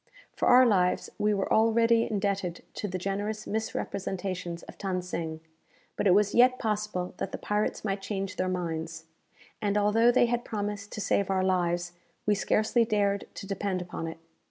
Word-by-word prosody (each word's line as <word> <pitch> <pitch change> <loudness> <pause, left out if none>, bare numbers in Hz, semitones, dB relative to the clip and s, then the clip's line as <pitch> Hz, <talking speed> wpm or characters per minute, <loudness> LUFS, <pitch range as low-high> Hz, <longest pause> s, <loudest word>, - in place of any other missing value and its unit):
For - - 0
our 255 +1 +8
lives 185 -6 +2
we 210 0 +2
were 195 -2 0
already 230 +1 +4
indebted 200 -4 -1
to 210 - -4
the 185 -1 -3
generous 205 +3 -3
misrepresentations 190 -5 -3
of - - -11
Than 190 -2 -1
Sing; 160 -3 -4 0.5
but - - +1
it 185 - +6
was 205 0 +3
yet 255 +1 +5
possible 210 -5 -2
that 190 - -3
the - - -4
pirates 210 +1 -1
might 195 -1 -1
change 195 -1 -3
their 185 0 0
minds, 165 -2 -3 0.6
and 205 -1 +1
although 220 +3 +4
they 245 - +4
had 240 0 -1
promised 205 -1 -4
to 215 - -4
save 200 -1 +1
our 190 -1 +1
lives, 175 -2 +1 0.3
we 210 - +4
scarcely 215 +3 +2
dared 205 -3 +1
to - - -7
depend 195 -1 -2
upon 175 -2 -5
it. 165 - -6
200 Hz, 175 wpm, -28 LUFS, 185-215 Hz, 0.6 s, our